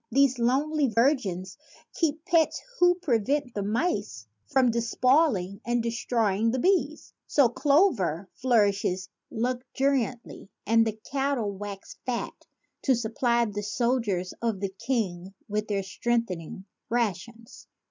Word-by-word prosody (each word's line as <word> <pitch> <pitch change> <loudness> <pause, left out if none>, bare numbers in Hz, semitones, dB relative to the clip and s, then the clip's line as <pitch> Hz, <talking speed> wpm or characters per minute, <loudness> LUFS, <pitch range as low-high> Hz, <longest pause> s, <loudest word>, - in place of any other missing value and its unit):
These 265 0 +3
lonely 280 +5 +2
virgins 220 - 0 0.3
keep 315 -1 -1
pets 330 -2 +2 0.2
who 355 0 +5
prevent 275 - 0
the 205 - -2
mice 235 - -2 0.2
from 265 -4 +3
despoiling 235 - +1
and 240 0 0
destroying 230 -2 0
the 250 - 0
bees, 320 -1 0
so 275 -5 +4
clover 240 - +2
flourishes 200 -6 +1 0.2
luxuriantly 250 -1 -2 0.2
and 225 0 +4
the 220 - -1 0.2
cattle 270 -6 0
wax 200 0 -8
fat 245 -2 -3 0.5
to 265 - +3
supply 235 +1 +1
the 205 -1 -4
soldiers 210 -4 -1
of 225 -4 -1
the 195 0 -2
king 195 -6 -2
with 210 0 -2
their 200 -2 -1
strengthening 190 -4 -2 0.2
rations. 230 0 -3
235 Hz, 115 wpm, -27 LUFS, 205-270 Hz, 0.5 s, who